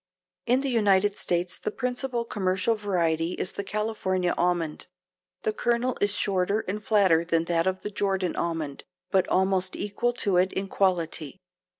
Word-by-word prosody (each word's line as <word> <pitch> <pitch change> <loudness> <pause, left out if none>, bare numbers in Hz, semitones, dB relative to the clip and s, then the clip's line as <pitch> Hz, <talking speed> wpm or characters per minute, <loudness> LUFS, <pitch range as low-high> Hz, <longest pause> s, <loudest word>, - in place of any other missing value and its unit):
In 250 +2 +4
the 275 - -1
United 205 -4 +3
States 175 +1 -1
the - - -2
principal 250 0 -2
commercial 190 +1 0
variety 175 -5 0
is 185 - -2
the 200 - -5
California 195 -4 -1
almond. 175 -3 -1 0.6
The 435 - 0
kernel 240 - 0
is 205 0 +3
shorter 200 +2 +1
and 210 +2 -5
flatter 190 -6 +4
than 165 -1 +1
that 165 +1 +1
of 190 0 -1
the 210 - -5
Jordan 195 -3 -1
almond, 160 -4 -3 0.3
but 190 -1 +3
almost 190 0 +1
equal 235 +4 -1
to 200 -6 +1
it 185 +1 +2
in 195 0 -3
quality. 170 -5 0
190 Hz, 160 wpm, -26 LUFS, 180-210 Hz, 0.6 s, In